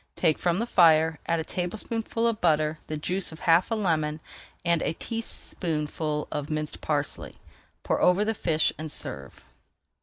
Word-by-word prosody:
Take 160 -4 +2
from 175 -1 +1
the 230 - 0
fire, 160 -6 +5
add 165 0 +1
a - - -1
tablespoonful 220 +7 -2
of 230 -2 +1
butter, 155 -2 +2
the 155 - -3
juice 180 +5 -2
of 160 - -11
half 165 +1 +4
a 225 - +1
lemon, 160 -7 0 0.5
and 170 -1 +3
a 155 - 0
teaspoonful 155 -9 -3
of 145 -1 -3
minced 155 -1 -3
parsley. 145 -2 -2 0.5
Pour - - 0
over 185 +4 +4
the 225 - +1
fish 160 -6 +1
and 155 -1 -4
serve. 70 - -6
165 Hz, 160 wpm, -27 LUFS, 155-185 Hz, 0.5 s, fire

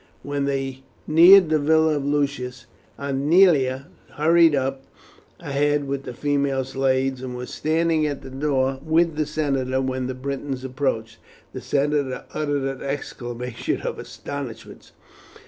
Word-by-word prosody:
When 145 -1 -2
they 135 -1 -3 0.2
neared 175 +3 +7
the 155 - +3
villa 160 +1 +3
of 140 - -3
Lucius, 140 -4 -2 0.3
Aemilia 140 -1 +3 0.3
hurried 165 0 +4
on 135 0 -1 0.6
ahead 145 0 0
with 135 0 -3
the - - -6
female 140 -1 0
slaves, 130 0 0
and 130 -1 -6
was 125 0 -7
standing 160 0 +1
at 145 -2 -5
the 130 - -9
door 135 -1 0
with 160 +1 +2
the 155 -1 -1
senator 135 -4 -1
when 130 -1 -2
the 130 - -4
Britons 135 0 -4
approached. 125 -4 -3 0.3
The - - -6
senator 140 -2 -1
uttered 145 -2 -1
an 135 -1 -4
exclamation 125 -3 -4
of - - -4
astonishment. 130 -6 -8
140 Hz, 135 wpm, -23 LUFS, 130-150 Hz, 0.6 s, neared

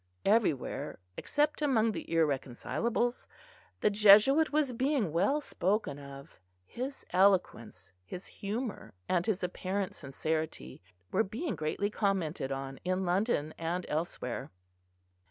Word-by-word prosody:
Everywhere, 200 - +1 0.2
except 295 - 0
among 230 -6 +3
the - - -5
irreconcilables, 165 - 0 0.5
the 210 - +3
Jesuit 215 +9 +6
was 295 -4 +1
being 255 - +1
well 205 - +2
spoken 190 - -1
of: 140 -1 -11 0.3
his 260 - -6
eloquence, 175 - +1
his 180 - -8
humour, 210 - -5
and 175 -1 +1
his 205 -3 0
apparent 185 +2 -2
sincerity 155 - -4 0.3
were - - +3
being 225 - -3
greatly 155 +7 -1
commented 180 -10 -1
on 135 0 -5
in 185 +1 0
London 175 -4 +1
and 170 +2 -2
elsewhere. 150 -6 -3
190 Hz, 115 wpm, -31 LUFS, 155-225 Hz, 0.5 s, Jesuit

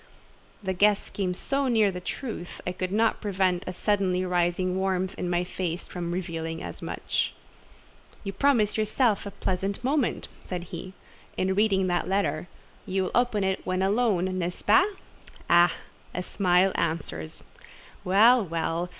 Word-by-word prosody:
The 190 -1 -1
guess 205 +2 +2
came 185 -3 -2
so 275 +7 0
near 220 -5 +3
the 180 - -5
truth, 180 -1 -6
I 180 - -1
could 185 0 -3
not 220 +2 +2
prevent 190 -3 +1
a - - -1
suddenly 185 -1 +1
rising 180 +1 +1
warmth 190 -1 0
in 180 - -3
my 175 0 +1
face 180 -1 -4
from 175 -1 -4
revealing 165 -2 -4
as - - -7
much. - - -2 0.9
"You 195 -2 -4
promise 225 -3 +2
yourself 215 -1 +1
a - - -3
pleasant 195 +1 -2
moment," 275 -1 0 0.2
said 180 -2 -4
he, 180 +2 -6 0.4
"in 190 +1 +1
reading 195 -1 +3
that 175 -1 0
letter; 190 -4 0 0.4
you 190 0 0
will - - -3
open 240 -4 +2
it 190 0 -1
when 185 +1 0
alone—n'est 185 -4 +1
ce - - -8
pas? 375 +1 +5 0.6
Ah! 175 0 +6 0.4
a 180 - -2
smile 185 0 +3
answers. 145 - -3 0.6
Well, 225 +6 +6
well! 165 0 -2
185 Hz, 150 wpm, -27 LUFS, 180-205 Hz, 0.9 s, Ah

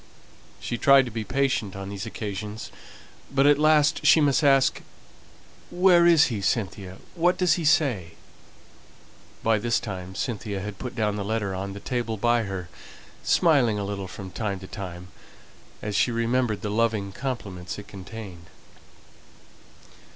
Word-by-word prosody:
She 120 - -4
tried 135 -1 +6
to 120 - -7
be 110 0 -3
patient 125 -6 -1
on 95 0 -6
these 100 +2 -6
occasions, 105 0 -6 0.6
but 135 0 +3
at 145 0 +5
last 155 0 +3
she - - +6
must 145 +1 +3
ask 135 -2 +4 0.9
"Where 175 -1 +5
is 165 -3 +6
he, 105 - -3
Cynthia? 95 -1 -2 0.2
What 175 +2 +2
does 180 -3 +3
he 170 - -2
say?" 120 - +2 1.3
By 110 -1 +3
this 120 +2 +1
time 95 -3 -7
Cynthia 105 -4 -3
had 100 +1 -7
put 125 -2 -6
down 105 -3 0
the 100 - -3
letter 105 -2 -2
on 95 +1 -4
the 100 - -8
table 115 -1 -3
by 120 +1 +2
her, 95 -3 -5 0.5
smiling 135 -11 +3
a 100 - -3
little 100 -1 -4
from 95 0 -9
time 100 -3 -3
to 95 - -9
time, 90 -2 -8 0.7
as 105 -1 -3
she 125 - +3
remembered 115 -1 0
the 105 - -2
loving 110 -3 0
compliments 95 -8 -5
it 105 - -10
contained. 95 -3 -10
110 Hz, 150 wpm, -25 LUFS, 100-130 Hz, 1.3 s, tried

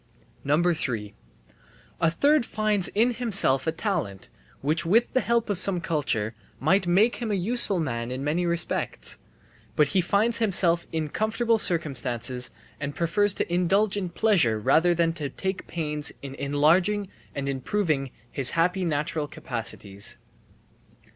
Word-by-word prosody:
3. 145 - 0 0.9
A 165 - +3
third 285 - +3
finds 215 -4 +1
in 235 +4 +1
himself 200 - +1
a - - +3
talent 160 - -3 0.3
which 155 +4 +1
with 220 +8 +2
the 260 - +3
help 235 -1 +1
of 205 -4 -1
some 185 -1 +4
culture 140 - -1 0.3
might 185 +6 +2
make 205 +7 +3
him 235 -2 -4
a 205 - +1
useful 200 0 +1
man 115 -6 -3
in 130 +2 -4
many 155 +5 0
respects. 170 - -2 0.6
But 150 -2 +3
he 190 - +2
finds 215 +6 +1
himself 175 -6 +2
in 160 -2 -2
comfortable 225 +4 +1
circumstances 125 - 0 0.3
and 145 0 -4
prefers 195 +4 +1
to 175 - -2
indulge 190 +4 +2
in 190 -3 -2
pleasure 170 - +2
rather 160 +9 +3
than 165 -1 +1
to 150 -4 -4
take 190 +6 -4
pains 150 -3 -1
in 135 -1 -6
enlarging 160 +9 +2 0.3
and 140 -1 -3
improving 140 +1 -1 0.2
his 135 -2 +3
happy 180 +3 +2
natural 150 -1 -1
capacities. 115 -9 -3
170 Hz, 140 wpm, -26 LUFS, 140-200 Hz, 0.9 s, some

